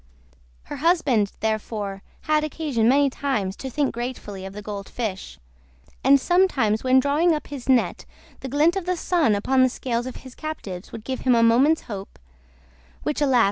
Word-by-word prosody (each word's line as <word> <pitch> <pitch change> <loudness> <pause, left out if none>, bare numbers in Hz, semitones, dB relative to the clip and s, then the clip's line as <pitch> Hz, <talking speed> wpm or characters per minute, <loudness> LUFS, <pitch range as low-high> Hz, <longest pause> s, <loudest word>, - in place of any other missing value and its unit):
Her - - -7
husband 280 - +2
therefore 215 -2 -2 0.2
had 305 -1 +1
occasion 285 -7 0
many 280 +2 +4
times 215 -10 -2
to 265 - -6
think 285 +2 -1
gratefully 230 -5 -5
of 195 - -10
the 210 - -7
Gold 200 -1 -6
Fish, 215 -6 -5 0.7
and 275 +2 +6
sometimes 275 - +2
when 260 0 +5
drawing 300 +5 +2
up 300 - -5
his 275 -3 -7
net 255 -2 +2 0.3
the 265 - -6
glint 300 +6 +3
of 380 -2 -3
the 365 -1 0
sun 320 - +2
upon 260 +6 +2
the 255 - +5
scales 240 -1 -3
of 255 - -7
his 260 - -10
captives 215 - -7
would 220 - -8
give 260 +2 -4
him 255 -2 +3
a 230 - +4
moment's 260 +8 +4
hope—which, 65 - -9
alas! 265 -4 +4
255 Hz, 175 wpm, -23 LUFS, 210-290 Hz, 0.7 s, and